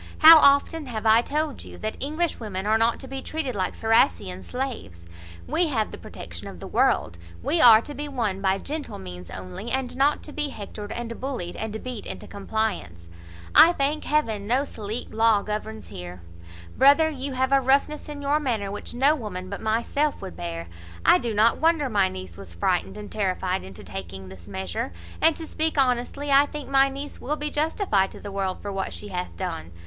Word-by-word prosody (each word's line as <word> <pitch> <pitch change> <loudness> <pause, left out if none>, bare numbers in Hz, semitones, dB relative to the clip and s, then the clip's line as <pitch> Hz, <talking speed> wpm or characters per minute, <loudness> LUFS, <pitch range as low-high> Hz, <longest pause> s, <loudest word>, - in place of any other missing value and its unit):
How 320 +1 +10
often 280 +2 +4
have 225 -3 -5
I 220 +1 +6
told 300 +2 -2
you - - -11
that 215 0 -4
English 310 +4 -1
women 200 -4 -4
are 220 +1 +3
not 230 +1 +2
to 265 - -8
be 270 0 -5
treated 310 -4 -3
like 190 -3 -2
Ciracessian[*] 95 - +2
slaves. 230 - -5 0.4
We 345 0 +2
have 225 -8 -1
the - - -7
protection - - -8
of - - -9
the - - -8
world; 85 0 +1 0.2
we 330 0 +2
are 225 -2 +9
to 295 - -7
be 295 +1 -5
won 225 -9 -2
by 190 0 +2
gentle 300 +8 -5
means 90 -2 -9
only, 90 - -7
and 260 0 -1
not 280 +3 +2
to 300 - -9
be 295 -1 -1
hectored, 205 -2 -8
and 235 -1 -5
bullied, 250 -10 -4
and 220 0 -5
beat 250 -4 -6
into - - -6
compliance. 195 - -3 0.4
I 340 - +8
thank 290 0 -1
Heaven 225 -9 0
no 255 +5 +2
Salique 220 -1 -6
law 220 -2 +3
governs 215 +1 -5
here. 90 0 -8 0.5
Brother, 285 +4 +6
you 275 -2 -4
have 260 +1 0
a 275 0 +5
roughness 280 +4 +1
in 290 -1 -6
your 290 +2 +2
manner 225 -9 -2
which 205 - -7
no 275 +4 +4
woman 195 -9 -6
but 200 - -5
myself 235 +7 0
would 85 - -8
bear. 85 -1 -5 0.4
I - - +7
do 235 - -2
not 220 +2 +3
wonder 320 -3 +2
my 200 -4 +3
niece 95 -2 -9
was 95 -4 -10
frightened 180 - 0
and 210 -1 -8
terrified 190 -2 -1
into 95 -1 -10
taking 95 0 -7
this 95 -2 -13
measure; 95 -2 -4 0.3
and, 325 - +5
to 325 - -6
speak 315 0 -1
honestly, 265 +2 +1
I 280 +1 +6
think 295 -1 -7
my 275 0 +5
niece 280 +2 -7
will 295 +4 -1
be 300 0 -3
justified 295 - +1
to - - -12
the 205 - -8
world 195 -1 -3
for 205 - -4
what 195 0 -3
she 205 - -7
hath 180 -1 -5
done. 170 - -4
225 Hz, 200 wpm, -25 LUFS, 190-280 Hz, 0.5 s, How